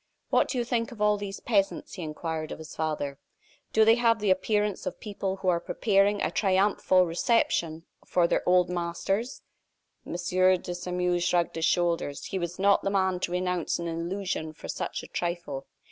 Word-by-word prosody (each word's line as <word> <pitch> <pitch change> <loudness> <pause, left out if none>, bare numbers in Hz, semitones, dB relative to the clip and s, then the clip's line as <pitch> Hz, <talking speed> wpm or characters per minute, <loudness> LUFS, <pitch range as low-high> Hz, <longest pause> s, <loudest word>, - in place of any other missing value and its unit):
"What - - +4
do 260 - -3
you 240 - +1
think 235 -1 -1
of 235 - -11
all 210 0 +4
these 200 -1 -6
peasants?" 200 -5 0
he 185 - -6
inquired 155 0 -4
of - - -5
his 160 0 -10
father. 150 -3 -2 0.5
"Do 220 0 +5
they 225 - +7
have 230 -1 +3
the 205 -2 +2
appearance 205 +2 0
of - - -5
people 200 -2 -3
who 190 -1 -6
are 170 -1 +2
preparing 200 +2 +2
a - - 0
triumphal 190 -2 +3
reception 170 -3 0 0.2
for 175 -2 +3
their - - +1
old 180 -1 +5
masters?" 180 +6 -2 0.6
M. - - -7
de 180 +1 +2
Sairmeuse 180 0 -1
shrugged 175 -1 +1
his 165 0 0
shoulders. 170 -5 0
He 190 - -3
was 175 0 -4
not 200 +1 +4
the - - -1
man 190 -2 +1
to 175 - -2
renounce 180 -1 -1
an 170 - -4
illusion 170 -1 -3
for - - -10
such - - -4
a - - -9
trifle. 170 -6 -4
180 Hz, 185 wpm, -27 LUFS, 170-200 Hz, 0.6 s, they